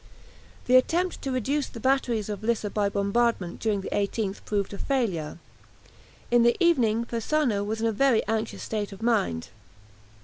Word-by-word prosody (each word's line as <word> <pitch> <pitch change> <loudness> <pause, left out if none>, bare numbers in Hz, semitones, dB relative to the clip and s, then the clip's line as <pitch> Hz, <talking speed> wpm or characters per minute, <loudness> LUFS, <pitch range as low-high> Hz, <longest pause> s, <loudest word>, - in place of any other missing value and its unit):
The 255 +1 +6
attempt 350 +8 +1
to 270 - -3
reduce 270 +3 0
the 230 - -10
batteries 245 -4 +1
of 210 -1 -5
Lissa 220 -2 0
by 205 -1 +1
bombardment 200 -2 0
during 210 -3 0
the - - -6
18th 200 0 -2
proved 205 -1 -1
a 200 - -7
failure. 195 - -1 0.9
In 240 0 +5
the 235 0 +4
evening 235 - +3
Persano 235 -2 0
was 220 +2 -3
in - - +1
a 225 - +2
very 245 +1 +2
anxious 220 +1 -2
state 210 -2 -3
of 195 +3 -10
mind. 205 - 0
225 Hz, 165 wpm, -26 LUFS, 205-250 Hz, 0.9 s, The